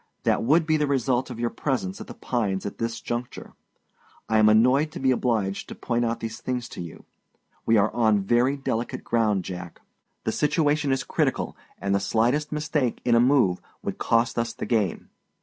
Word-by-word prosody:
That - - +2
would 155 +7 +3
be 155 -1 +2
the 150 -1 +1
result 130 -2 0
of 120 -2 -7
your 120 0 -1
presence 120 -10 -2
at - - -8
The - - -9
Pines 100 -6 -2
at 100 - -6
this 115 0 -2
juncture. 120 +1 -5 0.7
I 110 -1 +3
am 110 0 +6
annoyed 125 +8 +4
to - - -6
be 130 -1 +2
obliged 110 -6 -1
to - - -7
point 120 -1 -1
out 115 0 -2
these 115 +1 -5
things 125 -1 -3
to - - -7
you. 85 -2 -9 0.6
We 115 0 +5
are 105 +1 +2
on 110 -4 +3
very 120 +7 +2
delicate 120 -3 -3
ground, 105 -5 +1
Jack; 90 -2 -7 0.4
the - - 0
situation 150 -1 +1
is 135 -1 0
critical, - - -1 0.2
and 100 0 -1
the 100 - +3
slightest 120 +9 +1
mistake 150 -4 -1
in 120 - +3
a 115 - +6
move 120 -8 +3 0.2
would - - -4
cost 115 +1 +1
us 115 0 -1
the - - -5
game. 110 -7 -1
120 Hz, 195 wpm, -25 LUFS, 110-135 Hz, 0.7 s, am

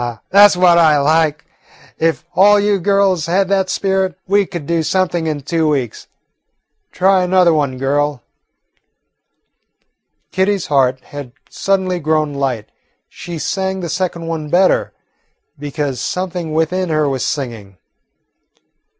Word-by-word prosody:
Now, 120 -2 -5
that 205 +2 +8
's - - -2
what 175 -1 +5
I 155 -3 +4
like. 150 0 +1 0.5
If 160 0 0
all 205 +3 +5
you 205 -1 +1
girls 195 -3 +1
had 190 +2 +1
that 190 -1 +1
spirit, 190 -3 -1
we 200 0 +2
could 170 -5 -7
do 170 +2 0
something 175 -1 -1
in 150 -2 -3
two 160 +1 0
weeks. 130 -7 -3 0.8
Try 190 0 +2
another 180 -1 +3
one, 140 -4 -1
girl." 145 0 -1 2.1
Kitty's 190 0 0
heart 130 -2 +1
had 140 -3 -10 0.2
suddenly 190 -2 -1
grown 155 -2 0
light. 130 -6 -3 0.4
She 175 -1 -8
sang 190 +3 -3
the 170 - -5
second 170 -1 -3
one 160 -2 -4
better 180 +4 +2 0.7
because 145 -3 -4
something 180 -3 -4
within 165 +4 -1
her 155 -2 +1
was 135 -2 -2
singing. 115 -9 -5
165 Hz, 135 wpm, -16 LUFS, 145-185 Hz, 2.1 s, that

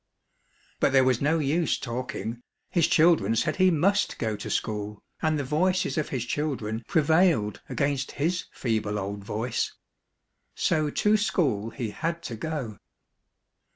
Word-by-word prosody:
" - - -36
But 135 - +2
there 135 -1 +6
was 130 -2 +2
no 155 +4 +2
use 155 +2 +1
talking, 120 -1 -4 0.3
his 170 -3 +3
children 155 - +4
said 115 - 0
he 185 0 +5
must 195 +5 +2
go 110 -3 -1
to 105 - -6
school, 105 -1 -3 0.2
and 155 -1 +1
the 145 - -1
voices 180 +7 +1
of 155 -3 -1
his 125 -3 -2
children 120 -6 -2
prevailed 160 - +3
against 140 -2 -1
his 170 +5 -1
feeble 110 -3 -1
old 100 0 -4
voice. 110 +4 -2 0.8
So 155 -1 +1
to 210 +8 +3
school 135 - 0
he 115 -2 -4
had 170 +6 -3
to 120 - -5
go. 125 - -4
140 Hz, 150 wpm, -27 LUFS, 110-160 Hz, 0.8 s, there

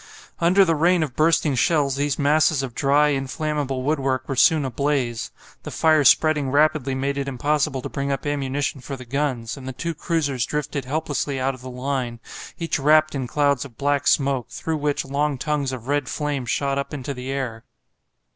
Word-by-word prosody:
Under 185 +4 +5
the 165 - +2
rain 170 +2 +3
of 135 -6 -5
bursting 155 -2 +3
shells 140 0 +2
these 145 0 -1
masses 150 0 +3
of 130 -3 -5
dry, 145 +3 +3
inflammable 135 -1 -2
woodwork 135 -3 0
were 135 - -2
soon 145 +3 +4
ablaze; 130 -3 -1 0.3
the - - -7
fire 155 -2 +3
spreading 150 0 +4
rapidly 145 -1 +2
made 140 +1 -1
it 140 - -3
impossible 135 0 0
to - - -3
bring 140 0 -3
up 135 - -3
ammunition 140 -1 -2
for 135 - -6
the 130 -1 -10
guns, 130 -2 -2
and 130 -1 -9
the 130 - -4
two 165 +7 -3
cruisers 145 -6 -1
drifted 150 -2 -3
helplessly 145 -1 -2
out 135 +1 0
of 130 - -12
the 130 - -8
line, 125 -2 -3 0.4
each 165 -3 -2
wrapped 155 +2 +4
in 135 -3 -3
clouds 140 0 +1
of 130 -5 -12
black 145 0 0
smoke, 135 -4 +2
through 160 -1 -3
which 145 -1 -1
long 140 +1 -1
tongues 145 -1 -1
of 125 -2 -7
red 145 +1 0
flame 145 -4 -2
shot 140 +3 0
up 140 +2 -4
into 140 0 -4
the 125 0 -7
air. 125 -5 -3
140 Hz, 190 wpm, -23 LUFS, 130-150 Hz, 0.4 s, Under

